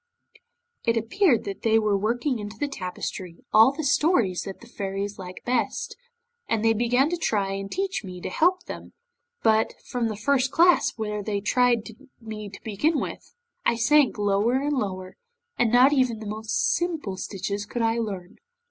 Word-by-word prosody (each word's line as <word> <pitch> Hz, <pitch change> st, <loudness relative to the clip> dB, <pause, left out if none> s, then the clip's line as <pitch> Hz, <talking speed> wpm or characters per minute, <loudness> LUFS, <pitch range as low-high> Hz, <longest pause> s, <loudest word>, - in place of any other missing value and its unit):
'It 230 Hz, 0 st, +2 dB
appeared 240 Hz, -, +2 dB
that 200 Hz, -1 st, -6 dB
they 225 Hz, -1 st, +3 dB
were 215 Hz, -2 st, +2 dB
working 235 Hz, +5 st, 0 dB
into 210 Hz, +1 st, -7 dB
the 290 Hz, -, -1 dB
tapestry 185 Hz, -6 st, -6 dB, 0.2 s
all 220 Hz, +4 st, +7 dB
the 305 Hz, +3 st, -5 dB
stories 270 Hz, -, +2 dB, 0.2 s
the 235 Hz, -, -14 dB
Fairies 200 Hz, -2 st, -4 dB
liked 180 Hz, -1 st, -9 dB
best, 255 Hz, -, -1 dB, 0.5 s
and 225 Hz, -1 st, +1 dB
they 225 Hz, -, +5 dB
began 245 Hz, +5 st, +2 dB
to 350 Hz, +2 st, -2 dB
try 205 Hz, -11 st, 0 dB
and 195 Hz, 0 st, -5 dB
teach 390 Hz, +1 st, -2 dB
me 180 Hz, -2 st, -8 dB
to 180 Hz, -, -5 dB
help 360 Hz, -, +2 dB
them, -, -, -9 dB, 0.5 s
but 220 Hz, 0 st, +3 dB
from 245 Hz, -2 st, -1 dB
the 215 Hz, -, -3 dB
first 260 Hz, +4 st, +1 dB
class, 340 Hz, 0 st, +4 dB
where 210 Hz, -1 st, -3 dB
they 205 Hz, 0 st, -2 dB
tried 240 Hz, +2 st, +2 dB, 0.3 s
me 215 Hz, -2 st, -7 dB
to 195 Hz, -, -11 dB
begin 285 Hz, +9 st, +1 dB
with, -, -, -7 dB, 0.3 s
I 235 Hz, -, +2 dB
sank 270 Hz, +3 st, +3 dB
lower 205 Hz, +4 st, +2 dB
and 285 Hz, +3 st, 0 dB
lower, 185 Hz, -6 st, -4 dB, 0.4 s
and 235 Hz, -2 st, +3 dB
not 255 Hz, +4 st, +6 dB
even 255 Hz, -5 st, +2 dB
the 220 Hz, -, -8 dB
most 220 Hz, -, 0 dB
simple 320 Hz, -, -2 dB
stitches 200 Hz, +2 st, -4 dB
could 240 Hz, +1 st, -2 dB
I 225 Hz, +1 st, +1 dB
learn. 195 Hz, -5 st, -5 dB
225 Hz, 175 wpm, -25 LUFS, 205-265 Hz, 0.5 s, all